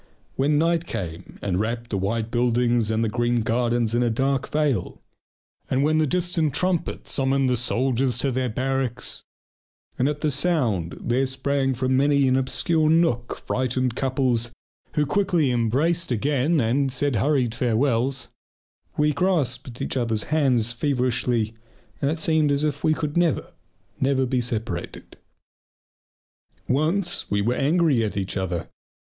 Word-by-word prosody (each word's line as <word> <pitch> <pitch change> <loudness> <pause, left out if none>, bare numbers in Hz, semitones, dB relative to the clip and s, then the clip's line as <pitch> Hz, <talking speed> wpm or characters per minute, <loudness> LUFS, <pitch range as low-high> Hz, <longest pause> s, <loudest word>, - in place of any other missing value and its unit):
When 145 +2 +2
night 165 +1 +1
came 85 -1 -6
and 95 -2 0
wrapped 115 +2 -3
the 100 - 0
white 110 +4 -2
buildings 120 -1 +2
and 110 +1 +1
the - - +1
green 120 +1 0
gardens 120 0 0
in 120 - +2
a 120 - +2
dark 135 +3 0
veil, 150 -5 -1 0.7
and 130 +1 +1
when 155 +1 +2
the 155 - +2
distant 165 -3 0
trumpet 175 +1 -1
summoned 135 0 +1
the 125 - +2
soldiers 125 +1 0
to 135 +2 0
their 130 0 -1
barracks, 130 +1 -2 0.8
and 130 +3 +3
at 150 0 -4
the 155 - +1
sound 125 - 0
there 130 +3 0
sprang 135 0 -1
from 130 +1 0
many 140 0 +3
an 130 - +3
obscure 155 +4 +1
nook 160 -8 +1
frightened 130 -1 -1
couples 130 -3 0 0.4
who 150 - +2
quickly 170 -3 +1
embraced 140 +8 +1
again 140 +6 +1
and 130 +3 +1
said 135 -1 0
hurried 125 0 +1
farewells, 125 +2 0 0.7
we 150 0 +2
grasped 140 -8 -1
each - - -3
other's 115 -4 0
hands 125 -7 +2
feverishly, 125 -3 0 0.5
and 140 - +1
it 160 +2 -2
seemed 155 -2 +2
as 140 +1 +1
if 150 -1 -2
we 155 - +3
could 150 -2 -3
never, 170 -4 +1 0.5
never 135 0 +2
be 125 0 0
separated. 110 -6 -5 1.5
Once 165 +7 0
we 100 - +1
were 115 +4 +1
angry 145 -3 +2
at 105 -2 -3
each 95 -1 -2
other. 95 -3 -2
130 Hz, 150 wpm, -24 LUFS, 120-150 Hz, 1.5 s, and